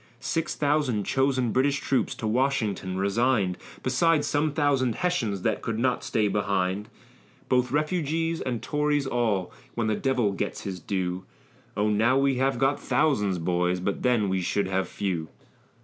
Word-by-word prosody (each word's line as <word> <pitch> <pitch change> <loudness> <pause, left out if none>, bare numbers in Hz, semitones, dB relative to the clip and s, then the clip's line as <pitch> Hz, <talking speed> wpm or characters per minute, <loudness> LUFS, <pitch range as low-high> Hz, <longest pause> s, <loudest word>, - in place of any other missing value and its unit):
Six 165 - -2
thousand 145 -7 +1
chosen 130 0 +1
British 140 +4 +2
troops 135 -3 0
to - - -6
Washington 110 -6 0
resign'd, 100 -1 +1 0.3
Besides 145 +4 +2
some 150 +1 +1
thousand 140 -5 +1
Hessians 115 - -1
that - - 0
could 115 -1 -3
not 125 +2 0
stay 105 -2 +1
behind; 100 0 -1 0.6
Both 125 0 +2
refugees 165 +2 0
and 120 -3 -3
Tories 150 -1 0
all, 115 -8 0 0.2
when 115 - 0
the 110 -1 +1
devil 125 -6 +1
gets 95 - -3
his 95 -2 -5
due, 95 0 -3 0.5
O 105 +1 +2
now 110 +5 +3
we 135 -1 +2
have 135 0 +1
got 135 +3 +2
thousands, 105 - +1
boys, 90 +1 0
but 100 +2 -2
then 120 -5 +2
we 95 -1 0
should 100 +3 0
have 95 -1 0
few. 90 -6 -3
120 Hz, 155 wpm, -26 LUFS, 100-140 Hz, 0.6 s, now